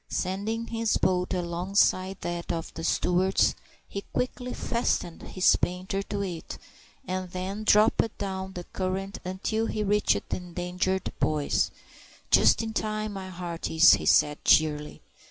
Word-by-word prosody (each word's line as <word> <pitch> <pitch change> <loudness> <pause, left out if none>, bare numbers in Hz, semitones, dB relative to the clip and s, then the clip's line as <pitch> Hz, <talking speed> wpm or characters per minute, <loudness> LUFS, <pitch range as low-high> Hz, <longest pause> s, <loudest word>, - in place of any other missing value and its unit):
Sending 205 +5 -2
his 230 -1 0
boat 180 -1 +1
alongside 185 +2 +1
that 175 0 -3
of 165 -1 -4
the 165 - -7
Stewarts', 180 +3 +2 0.3
he 200 - -5
quickly 250 0 -2
fastened 230 -10 -1
his 185 - +3
painter 185 +2 -2
to 200 0 -3
it, 175 -4 -6 0.5
and 185 0 -3
then 190 +4 -4
dropped 215 +1 +3
down 190 -1 -4
the 175 - -6
current 190 +2 -4
until 215 +5 -2
he 215 -1 -2
reached 210 +1 +1
the - - -1
endangered 180 +1 -2
boys. 150 -2 +1 0.6
"Just - - +5
in 225 0 -4
time, 215 -1 -2
my 190 -1 -6
hearties," 170 -2 +2 0.2
said 150 0 +4
he - - +8
cheerily. 150 -1 -2
185 Hz, 135 wpm, -27 LUFS, 175-205 Hz, 0.6 s, he